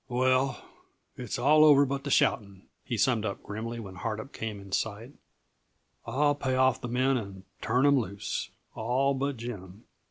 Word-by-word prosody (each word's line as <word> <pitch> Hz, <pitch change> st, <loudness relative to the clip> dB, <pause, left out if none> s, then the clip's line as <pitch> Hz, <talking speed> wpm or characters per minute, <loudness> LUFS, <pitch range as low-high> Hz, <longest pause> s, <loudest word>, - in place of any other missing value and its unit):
"Well, 130 Hz, +2 st, +1 dB, 0.5 s
it's 125 Hz, -4 st, -5 dB
all 150 Hz, +5 st, +5 dB
over 145 Hz, -2 st, +7 dB
but 140 Hz, +1 st, -4 dB
the -, -, -2 dB
shouting," 100 Hz, -7 st, +1 dB, 0.2 s
he 120 Hz, -, -3 dB
summed 115 Hz, -1 st, +2 dB
up 100 Hz, -2 st, -4 dB
grimly 115 Hz, +3 st, -5 dB
when 95 Hz, -4 st, -9 dB
Hardup 110 Hz, +6 st, -5 dB
came 110 Hz, -2 st, -5 dB
in 100 Hz, -1 st, -12 dB
sight. 110 Hz, +6 st, -3 dB, 0.9 s
"I'll 145 Hz, +2 st, +2 dB
pay 135 Hz, -2 st, -2 dB
off 130 Hz, -1 st, +2 dB
the 125 Hz, -, -4 dB
men 130 Hz, +2 st, +1 dB
and 100 Hz, -4 st, -7 dB, 0.2 s
turn 125 Hz, +4 st, +2 dB
'em 140 Hz, -1 st, +5 dB
loose 100 Hz, -3 st, -4 dB, 0.2 s
all 130 Hz, +5 st, 0 dB
but 140 Hz, 0 st, -2 dB
Jim. 105 Hz, -4 st, -8 dB
120 Hz, 165 wpm, -28 LUFS, 105-135 Hz, 0.9 s, over